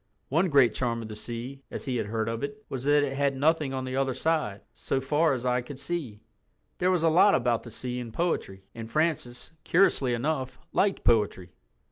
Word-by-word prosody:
One 170 Hz, +7 st, +2 dB
great 140 Hz, -5 st, +5 dB
charm 115 Hz, -2 st, -1 dB
of 110 Hz, -, -8 dB
the 105 Hz, -, -6 dB
sea, 120 Hz, +5 st, -7 dB
as -, -, -6 dB
he 130 Hz, -3 st, -1 dB
had 110 Hz, -, -2 dB
heard 110 Hz, +1 st, -2 dB
of 115 Hz, 0 st, -3 dB
it, 215 Hz, +10 st, -6 dB
was 130 Hz, -1 st, -4 dB
that 145 Hz, 0 st, +4 dB
it 135 Hz, -1 st, -1 dB
had 140 Hz, 0 st, 0 dB
nothing 150 Hz, 0 st, +2 dB
on 130 Hz, -1 st, -3 dB
the 130 Hz, 0 st, -4 dB
other 135 Hz, -2 st, 0 dB
side 150 Hz, -11 st, 0 dB
"so 135 Hz, -, -2 dB
far 150 Hz, +3 st, +2 dB
as 125 Hz, -1 st, -4 dB
eye 125 Hz, 0 st, +2 dB
could 130 Hz, +2 st, -9 dB
see." 145 Hz, -8 st, -4 dB, 0.6 s
There 180 Hz, -, +2 dB
was 180 Hz, -3 st, +2 dB
a 165 Hz, -, +5 dB
lot 180 Hz, +5 st, +6 dB
about 120 Hz, -2 st, +1 dB
the 120 Hz, -, -10 dB
sea 125 Hz, +2 st, -4 dB
in 120 Hz, -2 st, -6 dB
poetry, 110 Hz, -, -2 dB
and 115 Hz, -1 st, -7 dB
Francis, 155 Hz, -2 st, -1 dB
curiously 145 Hz, -9 st, +3 dB
enough, 130 Hz, +1 st, -2 dB
liked 195 Hz, -1 st, +1 dB
poetry. 105 Hz, -6 st, +2 dB
130 Hz, 210 wpm, -27 LUFS, 120-155 Hz, 0.6 s, lot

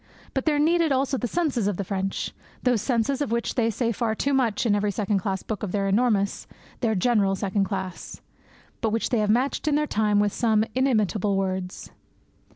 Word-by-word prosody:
But 265 Hz, -, -1 dB
there 305 Hz, -2 st, +2 dB
needed 325 Hz, +1 st, +3 dB
also 270 Hz, +1 st, +1 dB
the 245 Hz, -1 st, -2 dB
senses 275 Hz, -, 0 dB
of 205 Hz, -4 st, -1 dB
the 200 Hz, -, -2 dB
French 195 Hz, 0 st, -3 dB, 0.3 s
those 245 Hz, -4 st, +2 dB
senses 255 Hz, +3 st, 0 dB
of 285 Hz, -, -1 dB
which 235 Hz, 0 st, -1 dB
they 230 Hz, -2 st, +1 dB
say 230 Hz, +1 st, -1 dB
far 220 Hz, 0 st, -1 dB
too 280 Hz, +5 st, 0 dB
much 245 Hz, -4 st, +1 dB
in 220 Hz, -, +3 dB
every 205 Hz, 0 st, +1 dB
second 200 Hz, 0 st, 0 dB
class 190 Hz, 0 st, -3 dB
book 215 Hz, -3 st, -4 dB
of 205 Hz, -, -3 dB
their 200 Hz, -1 st, 0 dB
enormous, 200 Hz, -1 st, +1 dB, 0.3 s
their 225 Hz, -3 st, +1 dB
general 200 Hz, -1 st, +2 dB
second 195 Hz, +1 st, 0 dB
class, 190 Hz, -3 st, -5 dB, 0.6 s
but 225 Hz, -, +1 dB
which 225 Hz, +1 st, -1 dB
they 240 Hz, -, +2 dB
have 210 Hz, -1 st, +1 dB
matched 255 Hz, +7 st, +1 dB
in 295 Hz, -, +3 dB
their 300 Hz, 0 st, +2 dB
time 210 Hz, -6 st, +1 dB
with 205 Hz, -1 st, +1 dB
some 220 Hz, -2 st, +2 dB
inimitable 215 Hz, -6 st, +1 dB
words. 185 Hz, -1 st, -3 dB
220 Hz, 200 wpm, -25 LUFS, 200-250 Hz, 0.6 s, needed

